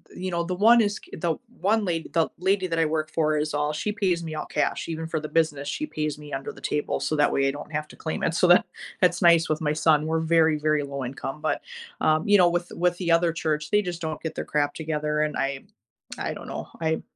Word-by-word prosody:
you 185 0 -4
know, 170 0 0
the 180 +1 -2
one 225 +5 +6
is 205 -1 -1
c - - -17
the 165 0 0 0.2
one 215 +2 +2
lad 165 -2 -1
the 165 -2 +2
lady 190 +1 +1
that 165 -1 -1
I 165 - +4
work 155 0 -1
for 155 -2 +1
is 150 0 -1
all 150 +1 0
she 210 +7 -2
pays 185 -5 0
me 155 -1 -5
all 150 - -4
cash; 150 - -1
even 160 0 -4
for 160 -1 -2
the 155 - -5
business, 150 -3 0
she 300 - -2
pays 150 - -3
me 150 -1 -11
under 135 0 -4
the - - -15
table, 150 0 -1
so 155 - -1
that 145 - +3
way, 135 0 +2
I - - 0
don't 145 +2 -9
have 150 0 -3
to - - -14
claim 160 - -4
it. 165 - +1
So 180 - +4
that 175 - +6 0.4
that's 180 -1 +3
nice 170 -2 +5
with 155 - 0
my 150 -1 +1
son- 155 -1 +3
we're 160 0 0
very, 160 -1 +3
very 150 -1 +1
low 140 -1 -5
income 135 +3 -6
but, 155 - -1 0.4
um, 155 0 +2
you 205 0 +6
know, 175 -2 +6
with 175 0 -2
with 175 +1 +1
the 170 -2 0
other 165 0 +3
church, 150 -2 -2
they 210 - +4
just 180 -3 -5
don't 160 -2 -4
get 160 - -3
their - - -4
crap 145 -1 0
together, 150 -1 -2
and 150 0 0
I 135 0 -2 0.5
I - - -3
don't - - -9
know. - - -6
I 160 0 0
160 Hz, 260 wpm, -25 LUFS, 150-175 Hz, 0.5 s, one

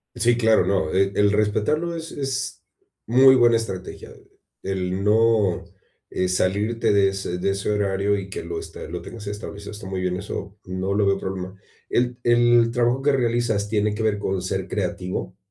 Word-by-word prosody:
Sí, 120 0 +2
claro, 110 -5 +4
no, 95 -5 +1
el 95 +1 +1
el 105 0 +4
respetarlo 110 +11 0
es 165 0 -6
es 135 -2 -4 0.4
muy 130 +3 +6
buena 120 -2 +5
estrategia, 95 -5 -6 0.5
el 95 0 -2
no, 105 -3 +3 0.5
eh, 95 - -1
salirte 100 +5 +1
de 100 -1 +4
ese 95 -2 -4
de 100 +2 0
ese 100 +1 -3
horario, 100 0 +1
y 100 -1 -6
que 95 - -5
lo, 85 0 -4
este, - - -9
lo - - -5
tengas 110 -3 -9
establecido, 100 0 -7
está 100 -2 -9
muy 95 -1 -3
bien, 90 0 -1
eso 100 +1 -6
no 95 +1 -2
lo 105 0 +2
veo 100 0 +2
problema. 95 0 -5 0.3
¿El 125 0 0
el 120 -1 +4
trabajo 120 +2 +1
que 145 +1 +3
realizas 120 -5 0
tiene 105 -1 +1
que 110 - -3
ver 110 -2 +1
con 95 -2 -2
ser 95 +1 -3
creativo? 90 -1 -3
105 Hz, 180 wpm, -23 LUFS, 95-115 Hz, 0.5 s, muy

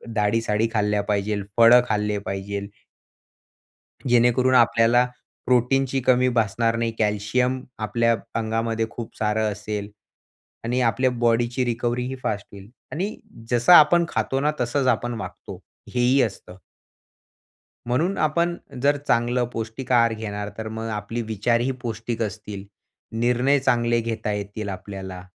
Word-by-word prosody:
दाळी-साळी 105 +1 +1
खाल्ल्या 105 -1 +1
पाहिजेल, 105 0 -1
फळं 115 +1 +8
खाल्ले 105 -1 0
पाहिजेल 100 +1 -4 1.4
जेणेकरून 120 +2 +3
आपल्याला 120 0 +4 0.4
प्रोटीनची 130 +2 +2
कमी 125 0 +3
भासणार 115 -1 +1
नाही. 115 0 -1
कॅल्शियम 110 +5 0 0.2
आपल्या 115 +2 +1 0.2
अंगामध्ये 115 0 -1
खूप 115 -2 -8
सारं 110 0 0
असेल 105 0 -5 0.8
आणि 120 +2 0
आपल्या 130 +2 +2
बॉडीची 120 +1 +1
रिकव्हरी 120 +1 -1
ही 130 +1 -4
फास्ट 100 -2 -2
होईल. 100 +1 -12 0.2
आणि 195 +7 -3 0.3
जसं 120 +6 +4
आपण 170 +1 +7
खातो 135 - -1
ना, 150 +2 +2
तसंच 130 +2 0
आपण 120 -1 +1
वागतो - - -9 0.3
हेही 125 +2 +3
असतं. 100 -4 -5 1.3
म्हणून 160 +11 0
आपण 170 +3 +1 0.3
जर 145 +2 +3
चांगलं 120 +1 +2
पौष्टिक 115 +3 -5
आहार 115 -2 +4
घेणार 105 -2 -5
तर 110 0 -5
मग 110 +1 -5
आपली 105 +2 -4
विचारही 115 +3 0
पौष्टिक 115 -1 -4
असतील. 105 -2 -5 0.5
निर्णय 125 +4 +2
चांगले 120 -2 +2
घेता 115 -1 -3
येतील 105 +1 -5
आपल्याला. 95 -1 -7
115 Hz, 125 wpm, -23 LUFS, 105-125 Hz, 1.4 s, फळं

